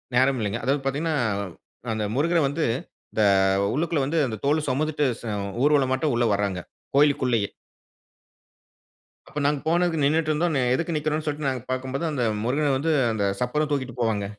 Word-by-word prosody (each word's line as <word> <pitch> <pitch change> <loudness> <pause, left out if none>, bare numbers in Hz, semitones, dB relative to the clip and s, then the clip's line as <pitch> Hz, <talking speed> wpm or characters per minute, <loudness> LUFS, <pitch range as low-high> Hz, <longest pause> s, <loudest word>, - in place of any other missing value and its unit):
நேரம் 130 +1 +3
இல்லங்க. 110 +2 -2
அதாவது 135 +3 +1
பார்த்தீங்கன்னா, 155 +4 0 0.8
அந்த 110 - -2
முருகர 165 +5 +2
வந்து 155 +3 -1 0.5
இந்த 110 - +2 0.5
உள்ளுக்குள்ள 160 +1 0
வந்து 160 +3 0
அந்த 110 -3 -4
தோலு 150 +2 +2
சுமந்துட்டு 150 +2 0 0.2
ச - - -17 0.4
ஊர்வல 145 -2 +4
மாட்டம் 145 +1 +1
உள்ளே 120 0 +2
வராங்க. 100 -2 -1 0.4
கோவிலுக்குள்ளேயே! 130 -7 +3 1.8
அப்ப 150 - -5
நாங்க 145 -1 +2
போனதுக்கு 170 -1 +2
நின்னுட்டு 155 +2 +2
இருந்தோம், 160 0 0
அ - - +2
எதுக்கு 165 +4 -2
நிக்கிறோன்னு 155 +1 -1
சொல்ட்டு 150 -1 -3
நாங்க 130 -3 -3
பார்க்கும்போது 130 +3 -3
அந்த 130 -5 -1 0.2
முருகன 140 +4 +1
வந்து 160 +4 0 0.2
அந்த 105 -2 0 0.2
சப்பரம் 150 +5 0
தூக்கிட்டு 130 -4 -2
போவாங்க. 110 -4 0
145 Hz, 155 wpm, -25 LUFS, 125-155 Hz, 1.8 s, ஊர்வல